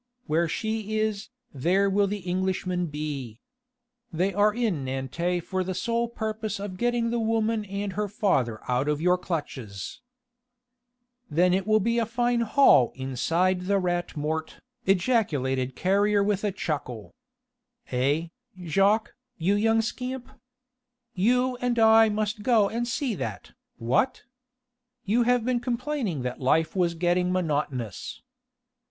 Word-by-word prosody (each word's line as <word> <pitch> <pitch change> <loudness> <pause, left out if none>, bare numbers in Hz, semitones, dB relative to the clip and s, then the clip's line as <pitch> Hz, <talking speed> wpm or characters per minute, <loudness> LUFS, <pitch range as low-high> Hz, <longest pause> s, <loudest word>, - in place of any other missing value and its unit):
"Where 165 +2 +1
she 215 +4 -2
is, 215 -2 -1 0.2
there 180 +9 +2
will 200 +1 +2
the 200 -2 -5
Englishmen 185 -1 -1
be. 145 -7 -5 0.7
They 180 +4 0
are 205 +2 +4
in 210 - -1
Nantes 135 +7 -2
for 185 +1 -2
the 185 0 -4
sole 235 +2 0
purpose 220 -2 -4
of 200 -2 -6
getting 240 -1 +1
the 235 - 0
woman 225 -1 0
and 200 0 -4
her 210 +2 -1
father 135 - 0
out 125 +3 0
of 150 -1 0
your 180 +2 +2
clutches...." 130 - -5 1.3
"Then 175 +4 +3
it 190 +1 0
will 215 0 +4
be 230 +3 +1
a 230 - 0
fine 240 +1 +1
haul 230 - +5
inside 170 +8 0
the 200 0 +3
Rat 175 -3 -2
Mort," 155 +2 -3 0.3
ejaculated 150 - +1
Carrier 200 +2 +2
with 205 0 0
a 205 - +1
chuckle. 135 - -4 0.8
"Eh, 140 +6 +1 0.3
Jacques, 195 +6 +2 0.2
you 185 +3 +1
young 225 +2 +3
scamp? 250 +2 -5 0.8
You 250 +6 +2
and 245 -1 -1
I 225 0 +6
must 210 0 -2
go 220 -3 +3
and 235 +2 -2
see 250 +1 -1
that, 105 - -5 0.3
what? 125 - 0 0.8
You 220 +5 +2
have 245 -2 +2
been 250 -1 +1
complaining 245 - -2
that 125 0 -4
life 155 +6 +2
was 175 -2 +1
getting 180 +1 +1
monotonous. 145 - -2
195 Hz, 135 wpm, -26 LUFS, 160-220 Hz, 1.3 s, I